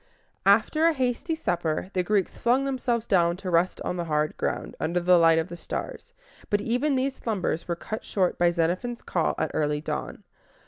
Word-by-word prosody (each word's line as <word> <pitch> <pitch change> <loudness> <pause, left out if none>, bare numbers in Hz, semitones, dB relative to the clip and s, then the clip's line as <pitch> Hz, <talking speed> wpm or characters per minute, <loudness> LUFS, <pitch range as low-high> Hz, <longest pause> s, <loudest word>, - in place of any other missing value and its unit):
After 230 +11 +4
a 335 - +3
hasty 260 +4 -1
supper, 175 - -2
the 185 - +1
Greeks 195 +1 0
flung 250 +3 +2
themselves 250 -4 -1
down 175 -5 +2
to 185 -1 -5
rest 170 +2 +2
on 180 - -3
the 175 - -2
hard 150 -1 0
ground, - - -3
under 170 +3 0
the 175 0 +5
light 165 -1 +5
of 165 +1 0
the 175 - -8
stars; - - -6 0.4
but 205 - +2
even 250 +7 0
these 265 +1 0
slumbers 190 -7 -2
were 170 - -1
cut 215 +5 -6
short 185 -3 0
by 175 0 +5
Xenophon's 180 +8 -1
call 170 -3 0
at - - -1
early 150 -1 0
dawn. 150 - -5
185 Hz, 190 wpm, -26 LUFS, 170-240 Hz, 0.4 s, the